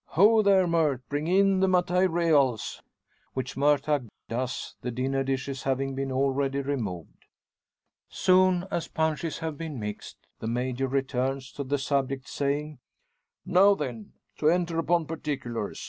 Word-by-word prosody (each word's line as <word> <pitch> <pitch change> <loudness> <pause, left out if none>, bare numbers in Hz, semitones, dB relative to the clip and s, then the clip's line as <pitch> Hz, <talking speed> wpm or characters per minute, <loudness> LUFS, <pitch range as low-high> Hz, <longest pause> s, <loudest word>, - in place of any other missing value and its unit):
Ho! 215 +5 +6
there, 195 -3 +4
Murt! 160 -6 +1
bring 145 +2 -2
in 195 +1 +4
the 190 - +3
`matayreals.'" 170 - +2 0.5
Which 130 - -3
Murtagh 145 -1 +2 0.2
does, 125 +2 -4
the 125 - -3
dinner 135 +3 -1
dishes 135 0 -3
having 135 0 -1
been 135 0 -3
already 135 +1 0
removed. 110 - -5 0.8
Soon 185 -1 +3
as 170 - -2
punches 160 0 -1
have 160 -3 -5
been 160 -6 -5
mixed, 105 -1 -6 0.2
the 110 - -5
Major 125 +3 -1
returns 135 0 -1
to 140 - -5
the 140 +2 -1
subject, 135 -1 -1
saying 145 0 -2 0.7
"Now 190 +2 +5
then; 120 - -6 0.2
to 155 - +3
enter 170 -1 +1
upon 165 0 +1
particulars. 135 -9 -4
140 Hz, 135 wpm, -27 LUFS, 130-165 Hz, 0.8 s, Ho